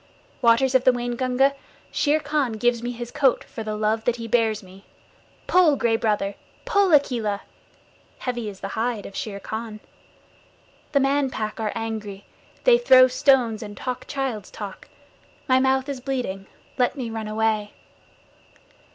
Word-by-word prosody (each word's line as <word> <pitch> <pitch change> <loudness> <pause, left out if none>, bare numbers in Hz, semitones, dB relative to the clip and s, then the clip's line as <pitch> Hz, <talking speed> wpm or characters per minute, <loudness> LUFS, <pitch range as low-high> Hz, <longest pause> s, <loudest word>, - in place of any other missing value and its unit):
Waters 245 +2 +4
of 260 -1 +4
the 255 - +6
Waingunga, 250 +2 +1 0.4
Shere 300 +1 +2
Khan 290 -5 -1
gives 235 +1 +1
me 240 - -3
his 240 0 -6
coat 270 -3 +2
for 225 - -8
the 215 0 -3
love 215 +1 0
that 245 - +2
he 230 -1 -6
bears 225 -2 +1
me. 190 +1 -15 0.6
Pull, 350 -5 +4
Gray 235 -3 +1
Brother! 210 -3 0 0.3
Pull, 405 -6 +3
Akela! 235 -9 +2 0.8
Heavy 240 -4 -3
is 195 -2 -11
the 195 - -4
hide 225 0 -2
of 195 - -10
Shere 200 -2 -4
Khan. 220 +1 -6 1.1
The 280 - +4
Man 275 0 +2
Pack 215 -4 -4
are 215 -2 -1
angry. 215 -3 -5 0.4
They 485 -1 +6
throw 260 - +7
stones 255 -4 +2
and 205 -2 -8
talk 250 -1 -5
child's 265 -8 -3
talk. 200 -3 -9 0.6
My 260 -1 +4
mouth 265 +1 +2
is 275 -3 -5
bleeding. 245 -8 -3 0.3
Let 250 +3 +2
me 245 -5 -4
run 220 -1 -4
away. 215 -1 -1
235 Hz, 155 wpm, -24 LUFS, 215-265 Hz, 1.1 s, throw